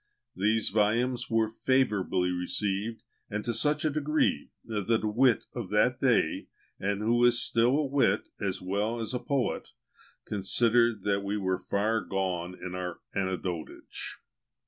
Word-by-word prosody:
These 110 +4 +2
volumes 115 +4 +1
were 115 -1 +2
favourably 105 -7 +1
received, 100 +5 -2 0.3
and 105 0 -3
to 120 - 0
such 150 +7 +1
a 155 - +2
degree, 150 - 0
that 110 +1 0
a - - +1
wit 120 +2 +3
of - - -5
that - - +2
day, - - +2 0.3
and 100 +1 -1
who 120 +2 +3
is 120 -1 +5
still 120 +3 +2
a 150 - +1
wit 140 0 +2
as - - -2
well 105 +5 -1
as 115 +2 -3
a 125 - -1
poet, 140 -2 -1 0.6
considered 115 +2 +2
that 100 -1 +1
we 100 +1 -1
were 95 -2 0
far 110 +3 0
gone 90 -2 -2
in 90 - -6
our 90 -1 -4
"Anecdotage." 95 -4 -3
110 Hz, 145 wpm, -29 LUFS, 95-120 Hz, 0.6 s, is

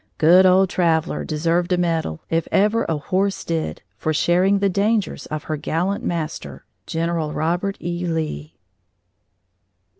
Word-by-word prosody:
Good 180 +4 +6
old 190 +1 +5
Traveller 165 -2 +1
deserved 165 +3 0
a 180 - +3
medal, 165 - -1
if 165 0 -1
ever 215 +3 +2
a 160 - 0
horse 190 +6 -1
did, 165 -1 -3 0.2
for 155 0 -1
sharing 180 +5 +3
the 200 0 +2
dangers 205 +2 0
of 155 -1 -5
her 155 - -3
gallant 175 +7 -2
master, 155 - -4 0.2
General 165 -2 -2
Robert 175 +5 -1
E. 175 +1 -3
Lee. 155 - -3
170 Hz, 140 wpm, -21 LUFS, 160-185 Hz, 0.2 s, Good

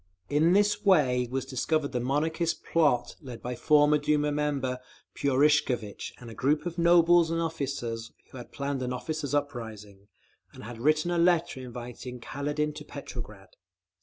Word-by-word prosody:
In 155 +4 +3
this 205 +1 +2
way 130 -11 +3
was 130 +1 -2
discovered 140 +3 -1
the 125 - -1
Monarchist 160 +6 -1
plot 150 -7 +1
led 125 -5 -8
by 125 - -5
former 150 +3 +4
Duma 150 0 +1
member 140 -4 -1 0.3
Purishkevitch 135 -6 +1
and 125 - -11
a 115 - -8
group 140 +8 0
of 175 0 -4
nobles 170 0 +5
and 165 0 -1
officers, 135 -8 -3 0.2
who - - -10
had 120 - -11
planned 140 -1 -3
an 125 0 -2
officers' 145 +2 -3
uprising, 110 -8 -5 0.5
and - - -11
had 115 +1 -8
written 155 +6 +2
a 175 - +1
letter 170 -4 +2
inviting 125 0 -8
Kaledin 145 +4 -2
to 150 - -7
Petrograd. 115 -9 -9
145 Hz, 155 wpm, -28 LUFS, 125-155 Hz, 0.5 s, nobles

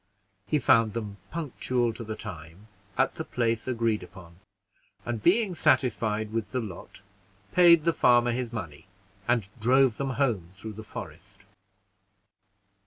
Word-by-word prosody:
He 155 - +2
found 115 -5 +4
them 105 -3 -5
punctual 130 -6 -1
to 115 - -7
the 110 0 -5
time, 90 -2 -9 0.3
at - - +2
the - - -5
place 115 -1 -1
agreed 115 -4 0
upon; 85 -1 -13 0.7
and 120 -2 -3
being 195 - +3
satisfied 110 -8 +1
with 110 -3 -3
the 130 - +1
lot, 100 -4 -8 0.5
paid 170 -3 +6
the 170 +1 +2
farmer 120 -2 +4
his 120 -1 -3
money, 85 -9 -7 0.4
and 120 -5 +1
drove 125 +1 +4
them 135 -1 -2
home 115 -12 0
through 110 +3 -8
the 110 +1 -9
forest. 95 +1 -10
115 Hz, 140 wpm, -27 LUFS, 105-130 Hz, 0.7 s, paid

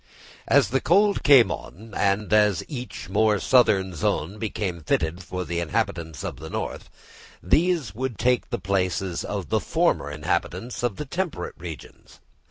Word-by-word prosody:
As - - +4
the 135 +3 +1
cold 200 +3 +3
came 135 -5 +7
on, 110 +4 -8
and 100 +1 +1
as 105 -4 +4
each 125 -5 -7
more 110 -1 +3
southern 100 -4 +3
zone 85 +4 -1
became 100 -5 -3
fitted 80 +3 -1
for 90 0 -5
the 85 +2 -2
inhabitants 80 -1 -2
of - - -5
the 80 +2 -8
north, - - -5 0.5
these 155 - +2
would 125 0 -3
take 125 +3 +1
the - - -1
places 95 -2 -1
of - - -4
the - - +2
former - - +1
inhabitants 75 +10 -2
of 120 -5 -1
the 150 - -5
temperate 170 - -3
regions. 80 -5 -10
100 Hz, 155 wpm, -24 LUFS, 85-125 Hz, 0.5 s, came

